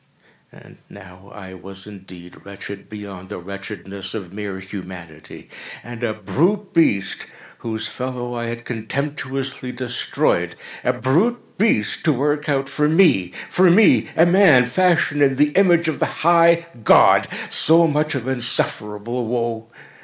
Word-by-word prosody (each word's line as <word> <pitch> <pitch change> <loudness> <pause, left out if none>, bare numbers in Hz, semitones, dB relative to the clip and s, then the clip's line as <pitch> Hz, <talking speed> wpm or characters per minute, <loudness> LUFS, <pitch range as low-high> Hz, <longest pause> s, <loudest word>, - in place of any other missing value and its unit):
And - - -17
now 95 -1 -14 0.3
was 95 +1 -10
I - - -9
indeed 90 -3 -14
wretched 100 0 -10
beyond 100 -3 -9
the 105 - -6
wretchedness 100 +1 -8
of 95 -4 -7
mere 100 -2 -5
Humanity. 90 -5 -10 0.4
And 120 -1 -9
a 115 - 0
brute 170 - -1
beast 105 - +1 0.3
—whose 110 -1 -5
fellow 125 +1 -5
I 120 -1 -4
had 115 0 -6
contemptuously 130 +2 -4
destroyed—a 125 0 -2
brute 160 - 0
beast 110 - +1
to 155 - +4
work 145 +3 -1
out 135 -1 0
for 150 +2 0
me—for 165 - +2
me 205 +5 +5
a 165 - +6
man, 175 -8 +5
fashioned 155 +1 +1
in 135 -1 +3
the 150 +2 +2
image 175 -2 +3
of 160 - -2
the - - -3
High 170 0 +5 0.2
God—so 165 +8 +4
much 150 -1 0
of 130 -2 -4
insufferable 120 -2 -1
woe! 115 -1 -3
125 Hz, 130 wpm, -20 LUFS, 100-150 Hz, 0.4 s, a